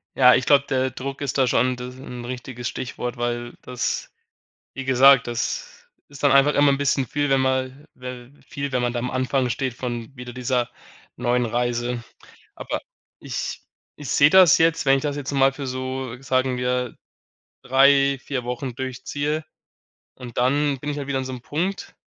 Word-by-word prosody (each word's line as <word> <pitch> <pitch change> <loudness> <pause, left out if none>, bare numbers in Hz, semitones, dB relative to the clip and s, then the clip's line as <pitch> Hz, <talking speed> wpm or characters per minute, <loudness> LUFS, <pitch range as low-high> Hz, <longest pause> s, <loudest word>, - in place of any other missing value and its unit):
Ja, 125 -2 +7
ich 125 - 0
glaube, 140 -1 +5
der 130 0 +1
Druck 135 +2 -6
ist 140 -1 -2
da 130 - +3
schon 125 +1 +2
d 125 - -8
äh, - - -6
'n 125 -1 -9
richtiges 125 -1 -6
Stichwort, 125 -1 -5
weil 120 0 -3
das 125 -1 -3 0.6
wie 135 - -5
gesagt, 135 0 +6
das 120 -1 -4 0.2
ist 145 0 -12
dann 145 -2 +5
einfach 140 +1 +5
immer 145 0 +5
'n 140 - 0
bisschen 135 -2 +1
viel, 145 0 -1
wenn 135 -1 +4
man 130 +1 -1
we 125 0 -9
viel, 140 -3 -4
wenn 125 -1 +1
man 120 -1 0
da 120 - -2
am 125 +1 -3
Anfang 130 0 0
steht 130 0 -2
von 120 0 -5
wieder 125 0 -8
dieser 125 -1 -1 0.5
neuen 125 0 +1
Reise. 120 +1 -1 0.5
Aber - - -4 0.4
ich - - -5 0.3
ich 145 -2 -8
sehe 145 0 +5
das 185 -3 +7
jetzt, 165 -1 +2
wenn 135 0 +5
ich - - -3
das 145 -1 -1
jetzt 145 -1 -4
mal 135 0 +4
für 135 0 -6
so 130 -1 -4
sagen 130 -1 0
wir 125 -1 -1 0.7
3, 135 +1 +4
4 130 -4 -3
Wochen 125 0 -4
durchziehe 145 +4 -3 0.7
und 125 -3 -10
dann 140 +3 +2
bin 145 - -3
ich 145 - -3
halt 140 - -5
wieder 135 -1 0
an 130 - -2
so 130 - -6
'nem 125 - -6
Punkt 175 +9 -3
130 Hz, 190 wpm, -23 LUFS, 125-140 Hz, 0.7 s, Ja